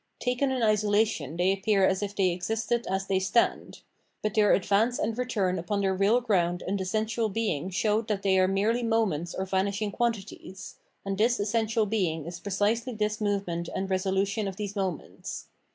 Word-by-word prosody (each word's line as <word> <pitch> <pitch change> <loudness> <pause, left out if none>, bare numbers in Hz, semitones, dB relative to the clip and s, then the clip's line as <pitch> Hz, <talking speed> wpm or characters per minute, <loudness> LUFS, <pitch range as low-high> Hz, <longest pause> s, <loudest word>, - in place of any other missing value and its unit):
Taken 250 +2 0
in 260 -2 -1
isolation 210 -7 +1
they 180 +2 +3
appear 195 0 +2
as 190 +1 +1
if 205 0 -4
they 190 -2 +3
existed 225 +6 -2
as 190 +1 -1
they 190 -1 +1
stand. 205 +5 0 0.4
But 215 -1 -1
their 210 -2 +4
advance 210 +5 +2
and 220 +1 -1
return 205 -7 0
upon 200 +4 -2
their 190 -1 +1
real 200 +6 +3
ground 180 -6 +1
and 195 +1 -1
essential 220 +4 -1
being 195 -6 -1
showed 210 +3 0
that 205 -3 -2
they 190 -1 +3
are 185 - +4
merely 210 +5 +1
moments 220 -8 0
or 190 - -2
vanishing 200 +2 -1
quantities; 195 -5 -4 0.3
and 195 0 -3
this 235 +2 +3
essential 220 +1 +1
being 180 -8 -1
is 175 +1 -7
precisely 215 +6 -1
this 215 0 -1
move 205 -1 0
ment 170 0 -4
and 190 0 -2
resolution 195 +2 0
of 190 - -4
these 205 0 -5
moments. 190 -5 -5
200 Hz, 180 wpm, -28 LUFS, 190-220 Hz, 0.4 s, their